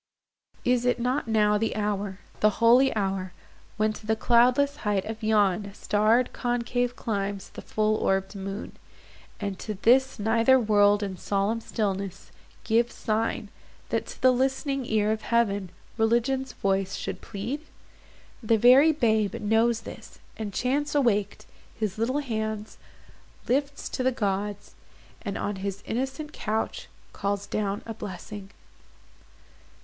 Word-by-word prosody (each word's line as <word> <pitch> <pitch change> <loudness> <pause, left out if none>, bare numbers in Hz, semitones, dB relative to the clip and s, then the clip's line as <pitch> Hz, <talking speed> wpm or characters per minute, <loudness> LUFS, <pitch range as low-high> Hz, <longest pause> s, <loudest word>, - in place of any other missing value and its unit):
Is 245 -1 +3
it 245 0 +1
not 250 +3 0
now 210 -2 +3
the 225 - -1
hour, 205 -2 -2 0.2
The 215 - +5
holy 245 +4 +5
hour, 190 -3 -2 0.4
when 215 0 +2
to 215 0 -11
the 220 - +2
cloudless 250 +5 +3
height 205 -3 -1
Of 220 +1 -6
yon 205 -2 +2
starred 220 +4 +2
concave 245 0 -1
climbs 200 -4 -3
the - - -9
full 215 0 0
orbed 195 0 0
moon, 195 +1 -6 0.6
And 200 -2 -4
to 215 - -4
this 260 +7 +3
nether 230 +4 +4
world 205 -2 +4
in 190 -2 -4
solemn 200 +5 0
stillness, 195 -4 -3 0.3
Gives 235 +1 +1
sign, 215 -1 -1 0.4
that, 230 -1 -1
to - - -10
the 255 - +7
list'ning 265 +1 0
ear 215 -1 +2
of 220 0 -1
Heaven 205 -5 +1 0.3
Religion's 240 +4 +1
voice 195 0 0
should - - -5
plead? 230 +9 -5 0.8
The 225 -1 +3
very 255 +8 +7
babe 220 - +1
Knows 225 +2 +2
this, - - -11 0.2
and, 215 -2 -5
chance 285 +8 -1
awak'd, 210 -8 +1 0.3
his 215 -2 -3
little 255 +6 +1
hands 220 -4 -4 0.7
Lifts 280 +3 0
to - - -3
the 260 +1 +2
gods, 205 -2 -2 0.5
and 200 -3 -4
on 205 -1 -3
his 195 +1 -4
innocent 270 +5 -3
couch 220 0 -3 0.3
Calls 200 0 -2
down 205 -1 -2
a 225 - -5
blessing. 205 -1 -8
220 Hz, 135 wpm, -26 LUFS, 205-245 Hz, 0.8 s, the